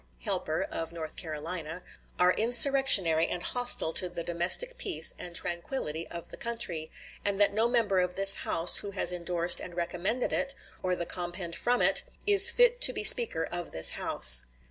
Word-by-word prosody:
Helper - - -4
[of 165 0 -8
North 160 -2 -10
Carolina], 160 +1 -8 0.4
are 180 0 +1
insurrectionary 230 - +4
and 180 - -7
hostile 245 -10 -1
to 180 - -1
the 170 -1 -9
domestic 175 - 0
peace - - +3
and 175 -1 -9
tranquillity 170 - -4
of 170 -1 -11
the - - -11
country, 205 -10 -4 0.3
and 200 -1 -2
that 200 -1 +1
no 220 +3 -1
member 230 -6 -1
of 180 0 -4
this 195 0 +6
House 165 +1 +3
who 205 - -4
has 190 -3 +3
indorsed 175 0 +2
and 175 - -11
recommended 180 +7 -4
it, 275 0 -2 0.3
or 185 -1 -3
the 170 - -7
compend 175 0 -6
from 245 +7 -2
it, - - +3 0.2
is 400 -1 +5
fit - - +1
to - - +5
be - - -3
Speaker 230 - +6
of 175 +1 -8
this 80 - +4
House." - - -2
180 Hz, 175 wpm, -26 LUFS, 170-235 Hz, 0.4 s, this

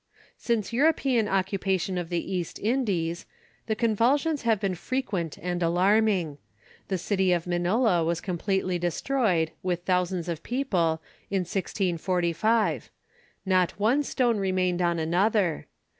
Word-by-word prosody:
Since 230 -2 -1
European 265 -4 +2
occupation 190 -1 0
of 175 -2 -3
the 175 +2 -2
East 175 -3 -3
Indies, 195 -8 -1 0.4
the 220 - 0
convulsions 245 +8 +2
have 225 -3 +2
been 195 -2 -1
frequent 190 - -3
and 180 0 -3
alarming. 180 -2 +2 0.5
The 190 - -1
city 190 +1 +1
of 175 -2 +1
Manila 180 +2 +2
was 170 +1 0
completely 185 0 -1
destroyed, 175 -2 0
with 175 -1 -2
thousands 180 -1 0
of 170 -2 -3
people, 180 -12 0 0.3
in 195 -1 0
1645. 180 +3 0 0.6
Not 185 -1 +1
one 235 +8 +3
stone 245 -5 +1
remained 185 -2 0
on 170 -1 +1
another. 175 +2 +1
185 Hz, 125 wpm, -26 LUFS, 175-220 Hz, 0.6 s, one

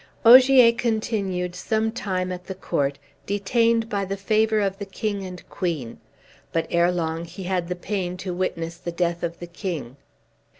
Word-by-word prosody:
Ogier 255 0 +9
continued 210 -6 -1
some 220 +4 0
time 185 -6 -2
at 180 0 -6
the 190 - -5
court, 140 -6 -1 0.3
detained 230 +3 +2
by 200 -2 -1
the 195 +1 -3
favor 215 +2 +2
of 195 -1 -1
the 200 - -4
king 200 0 -3
and 180 -2 -9
queen; 155 -10 -3 0.5
but 165 - 0
erelong 170 -1 +1
he 175 +3 -9
had 180 -1 -1
the 180 - -2
pain 180 -1 -3
to 185 -1 -4
witness 170 -2 -3
the 175 0 -5
death 170 0 -1
of 170 -1 -3
the 175 - -7
king. 170 - -5
185 Hz, 165 wpm, -24 LUFS, 175-215 Hz, 0.5 s, Ogier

